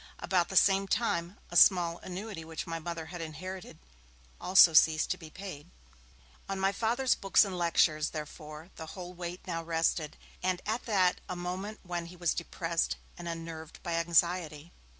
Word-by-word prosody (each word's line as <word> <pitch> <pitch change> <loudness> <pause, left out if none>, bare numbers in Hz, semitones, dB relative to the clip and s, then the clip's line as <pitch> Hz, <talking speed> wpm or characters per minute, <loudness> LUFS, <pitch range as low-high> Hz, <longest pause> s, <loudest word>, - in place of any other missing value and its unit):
About 180 -2 +1
the 190 - -6
same 195 +1 +5
time, 190 -4 -1
a - - -7
small 175 -1 +5
annuity 185 -1 -6
which 160 -1 -6
my 165 -1 -4
Mother 165 0 -5
had 175 - -5
inherited 185 +4 -7 0.6
also 180 -2 +7
ceased 155 0 +5
to - - -1
be 160 -3 -10
paid. 180 -4 -9 0.8
On 195 0 -2
my 195 +1 +2
Father's 235 +5 +1
books 195 +2 +4
and 190 -2 -5
lectures, 160 -3 +2
therefore, 155 +2 -8
the 160 - -7
whole 180 -1 -7
weight 175 0 -7
now 165 -2 -3
rested, 165 -2 -1 0.2
and 185 -1 0
that 225 +3 -3
at 185 -4 +3
a 180 - -3
moment 185 +4 -5
when 175 -2 -4
he 175 - -11
was 175 -1 0
depressed 170 -1 -2 0.2
and 175 - -8
unnerved 165 -1 -7
by 170 - -3
anxiety. 165 -1 +1
175 Hz, 170 wpm, -30 LUFS, 165-185 Hz, 0.8 s, also